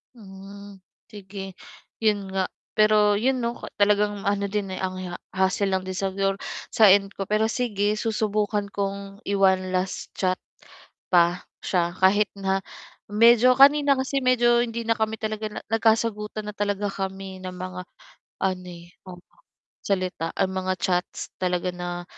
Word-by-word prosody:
Hmm. 200 Hz, -1 st, -12 dB, 0.3 s
Sige 195 Hz, -2 st, -9 dB, 0.5 s
'yun 205 Hz, -3 st, +2 dB
nga, 190 Hz, -1 st, -2 dB, 0.2 s
pero 215 Hz, -1 st, +4 dB
'yun 255 Hz, +5 st, +1 dB
'no 235 Hz, 0 st, -2 dB
ka -, -, -9 dB
talagang 205 Hz, 0 st, +2 dB
ano 200 Hz, 0 st, +1 dB
din, 195 Hz, -2 st, -2 dB
eh, -, -, -6 dB
ang 185 Hz, 0 st, -3 dB
ha 175 Hz, -, -6 dB, 0.2 s
hustle 190 Hz, +1 st, +1 dB
lang 190 Hz, 0 st, -1 dB
din 185 Hz, -, -4 dB
siguro 195 Hz, +1 st, 0 dB, 0.3 s
sa 215 Hz, -5 st, +6 dB
end 195 Hz, 0 st, +3 dB
ko, 195 Hz, -, -3 dB
pero 215 Hz, +3 st, +1 dB
sige 210 Hz, -3 st, 0 dB
susubukan 210 Hz, -1 st, -1 dB
kong 200 Hz, 0 st, -4 dB
i-one 190 Hz, -2 st, +2 dB
last 185 Hz, +1 st, -2 dB
chat 185 Hz, -1 st, 0 dB, 0.8 s
pa 175 Hz, 0 st, +3 dB, 0.2 s
siya 175 Hz, -1 st, 0 dB
kahit 200 Hz, +3 st, +4 dB
na 195 Hz, -1 st, 0 dB, 0.5 s
medyo 235 Hz, +3 st, +6 dB
kanina 280 Hz, +1 st, +6 dB
kasi 270 Hz, +1 st, 0 dB
medyo 240 Hz, -1 st, +4 dB
hindi 235 Hz, 0 st, -4 dB
na 230 Hz, -, +3 dB
kami 220 Hz, 0 st, 0 dB
talaga 215 Hz, 0 st, -3 dB
na -, -, -6 dB
nagkasagutan 220 Hz, -1 st, +1 dB
na 210 Hz, -, -8 dB
talaga 205 Hz, 0 st, -1 dB
kami 190 Hz, -1 st, -5 dB
ng 185 Hz, 0 st, -6 dB
mga 185 Hz, 0 st, -6 dB, 0.6 s
ano, 185 Hz, -1 st, -1 dB
eh, 175 Hz, -1 st, -11 dB, 0.2 s
oo 180 Hz, -1 st, -10 dB, 0.7 s
salita, 185 Hz, -4 st, -1 dB
ah, 190 Hz, -, 0 dB
mga 185 Hz, 0 st, -1 dB
chats 180 Hz, 0 st, -2 dB
talaga 180 Hz, -1 st, 0 dB
na, 175 Hz, 0 st, -5 dB
200 Hz, 150 wpm, -24 LUFS, 185-215 Hz, 0.8 s, sa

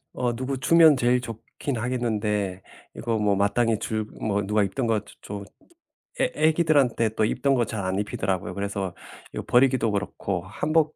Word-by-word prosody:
어 125 Hz, -1 st, -1 dB
누구 130 Hz, +3 st, -3 dB
주면 160 Hz, +3 st, +6 dB
제일 125 Hz, 0 st, +2 dB
좋긴 120 Hz, +3 st, -6 dB
하겠는데 105 Hz, -5 st, -1 dB, 0.3 s
이거 115 Hz, -1 st, -1 dB
뭐 105 Hz, -2 st, +2 dB
마땅히 110 Hz, +3 st, +2 dB
줄 110 Hz, 0 st, -2 dB, 0.2 s
뭐 105 Hz, -1 st, 0 dB
누가 105 Hz, +1 st, +1 dB
입던 115 Hz, +6 st, -1 dB
것 110 Hz, -2 st, +1 dB
주 -, -, -15 dB
좀 100 Hz, 0 st, -6 dB, 0.8 s
애 255 Hz, -, +2 dB
애기들한테 150 Hz, -7 st, +3 dB
또 110 Hz, 0 st, 0 dB
입던 135 Hz, +5 st, +1 dB
것 120 Hz, -2 st, +2 dB
잘 110 Hz, -4 st, -4 dB
안 95 Hz, +1 st, -1 dB
입히더라고요. 95 Hz, -3 st, -2 dB
그래서 100 Hz, -1 st, -3 dB, 0.4 s
이거 -, -, -4 dB
버리기도 125 Hz, -2 st, +4 dB
그렇고 100 Hz, -2 st, -2 dB
한복 155 Hz, +9 st, 0 dB
115 Hz, 330 characters per minute, -25 LUFS, 100-130 Hz, 0.8 s, 주면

